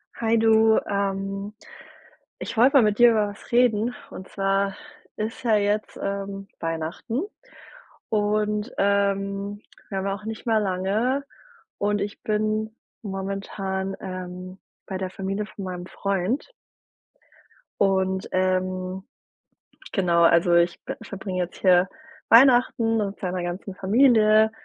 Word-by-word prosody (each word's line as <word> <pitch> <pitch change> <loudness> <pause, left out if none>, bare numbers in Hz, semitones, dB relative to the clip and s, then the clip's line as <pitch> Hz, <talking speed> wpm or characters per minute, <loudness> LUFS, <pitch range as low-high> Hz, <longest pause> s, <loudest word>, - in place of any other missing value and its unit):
Hi 230 0 +1
du. 220 0 +5
Ähm, 195 0 -2 0.9
ich - - -5
wollte 255 +5 +5
mal 255 - +6
mit 210 0 +1
dir 240 0 +8
über 215 -2 +1
was 205 - -13
reden 240 -1 +3 0.2
und 185 - -9
zwar 195 0 0 0.4
ist 220 +3 -4
ja 225 -3 +3
jetzt, 210 +1 0
ähm, 195 0 -4
Weihnachten 165 - -3 0.9
und, 210 +1 0
ähm, 200 0 0 0.3
wir 195 - -3
haben 190 - -3
auch 195 +1 -4
nicht 220 0 -6
mehr 220 -1 +3
lange 210 +8 0 0.5
und 205 0 0
ich 205 +1 -5
bin 215 +1 -1 0.3
momentan, 195 -1 -4
ähm, 185 0 -7 0.3
bei 190 - -3
der 190 -1 -3
Familie 195 +2 -3
von 200 - -9
meinem 180 -1 -5
Freund 200 - -2 1.3
und, 190 -1 +1
ähm 185 0 -1 0.9
genau 175 -3 +3
also 170 +1 +5
ich 170 0 +2
b - - -5
verbringe 190 -2 -3
jetzt 175 - -9
hier 180 -1 +5 0.4
Weihnachten 240 -2 +5
mit 205 -2 -2
seiner 180 -1 -3
ganzen 180 +2 -5
Familie 220 0 +4
200 Hz, 125 wpm, -24 LUFS, 190-215 Hz, 1.3 s, dir